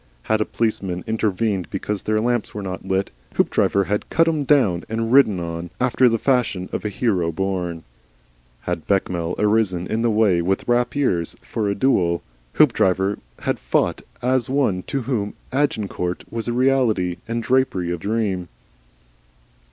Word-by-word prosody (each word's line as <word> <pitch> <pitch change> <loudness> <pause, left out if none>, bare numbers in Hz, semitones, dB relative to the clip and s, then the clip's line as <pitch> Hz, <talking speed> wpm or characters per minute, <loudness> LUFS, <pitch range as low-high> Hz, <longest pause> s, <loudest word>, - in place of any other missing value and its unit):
Had 110 0 +1
a - - +2
policeman 95 -6 -2
intervened 105 -5 -1
because 100 +1 -3
their 110 0 0
lamps 120 -1 -1
were 105 - -4
not 95 -1 -5
lit, 95 +1 -1 0.2
Hoopdriver 100 - +2
had 105 +2 -2
cut 165 0 +3
him 155 -3 +1
down 110 - +3
and 115 +1 -1
ridden 110 -9 +5
on, 85 0 -5
after 125 0 +4
the 115 - +1
fashion 115 -8 0
of - - -3
a 105 - -1
hero 95 -6 0
born. 90 -2 -2 0.8
Had 90 -2 -4
Bechamel 90 -3 0
arisen 105 -4 +1
in 110 +4 -1
the 120 - +2
way 105 -5 +3
with 95 +3 -1
rapiers 120 - +1
for 105 -2 -2
a 100 - 0
duel, 90 -8 +2 0.3
Hoopdriver 95 +2 +3 0.2
had - - -1
fought - - 0 0.2
as 130 -1 +1
one 130 -9 +1
to 135 -2 -2
whom 110 -5 -2 0.2
Agincourt 105 -10 -1
was 115 0 -4
a - - 0
reality 120 -8 +2
and 115 0 -2
drapery 125 -10 +1
a - - -3
dream. 100 -2 -1
105 Hz, 155 wpm, -22 LUFS, 90-120 Hz, 0.8 s, ridden